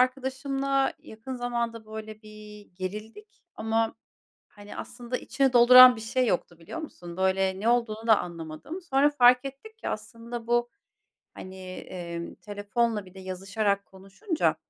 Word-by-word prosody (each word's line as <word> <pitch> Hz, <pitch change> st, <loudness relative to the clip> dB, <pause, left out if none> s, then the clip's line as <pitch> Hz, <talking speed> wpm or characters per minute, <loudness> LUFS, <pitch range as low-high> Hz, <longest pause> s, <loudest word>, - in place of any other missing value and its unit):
arkadaşımla 270 Hz, +1 st, 0 dB
yakın 260 Hz, -2 st, -8 dB
zamanda, 235 Hz, -2 st, -3 dB
böyle, 215 Hz, 0 st, -8 dB
bir 210 Hz, -1 st, -12 dB
gerildik 215 Hz, -, -8 dB
ama, 225 Hz, 0 st, 0 dB, 0.5 s
hani, 205 Hz, 0 st, -12 dB
aslında 245 Hz, +1 st, -5 dB
içini 270 Hz, -2 st, 0 dB
dolduran 250 Hz, +1 st, +10 dB
bir 220 Hz, -, -8 dB
şey 250 Hz, +3 st, 0 dB
yoktu, 175 Hz, -4 st, -1 dB
biliyor 170 Hz, -, -7 dB
musun? 175 Hz, -, -9 dB
Böyle, 190 Hz, 0 st, +1 dB
ne 225 Hz, +4 st, +1 dB
olduğunu 230 Hz, -2 st, 0 dB
da 220 Hz, -2 st, +6 dB
anlamadım. 170 Hz, -, -7 dB
Sonra 285 Hz, -3 st, +3 dB
fark 250 Hz, -3 st, +5 dB
ettik 275 Hz, +12 st, -9 dB
ki -, -, -4 dB
aslında 230 Hz, +2 st, -6 dB
bu, 240 Hz, 0 st, +2 dB, 0.6 s
hani, 185 Hz, 0 st, -10 dB, 0.2 s
emm, 170 Hz, -2 st, -7 dB
telefonla 210 Hz, +1 st, -2 dB
bir 185 Hz, -, -16 dB
de 190 Hz, -, -11 dB
yazışarak 195 Hz, +2 st, -1 dB
konuşunca 195 Hz, -, -2 dB
225 Hz, 140 wpm, -27 LUFS, 200-255 Hz, 0.6 s, dolduran